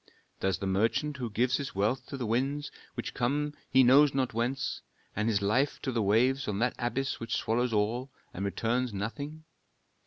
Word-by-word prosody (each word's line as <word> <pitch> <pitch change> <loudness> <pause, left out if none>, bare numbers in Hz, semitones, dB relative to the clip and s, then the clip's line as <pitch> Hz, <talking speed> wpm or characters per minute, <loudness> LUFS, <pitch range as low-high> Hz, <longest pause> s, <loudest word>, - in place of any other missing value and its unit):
Does 95 -2 +1
the - - -4
merchant 115 +10 +1
who 125 -3 -3
gives 125 +4 +1
his 140 -6 -5
wealth 110 +6 0
to 140 - -6
the 125 - -3
winds, 135 +6 -1 0.2
which - - -4
come 145 +4 0 0.2
he 130 0 +6
knows 135 +3 +6
not 130 -3 0
whence, 125 +3 -1 0.3
and 105 +2 +1
his 100 -3 +1
life 125 +8 +1
to 130 - -1
the 115 -2 0
waves 125 +7 +2
on 105 -2 -1
that 120 +3 +1
abyss 130 +3 -1
which 115 0 -2
swallows 120 +2 0
all, 115 +5 0 0.2
and 95 - -4
returns 115 +4 -1
nothing? 140 +10 -5
120 Hz, 185 wpm, -30 LUFS, 110-135 Hz, 0.3 s, he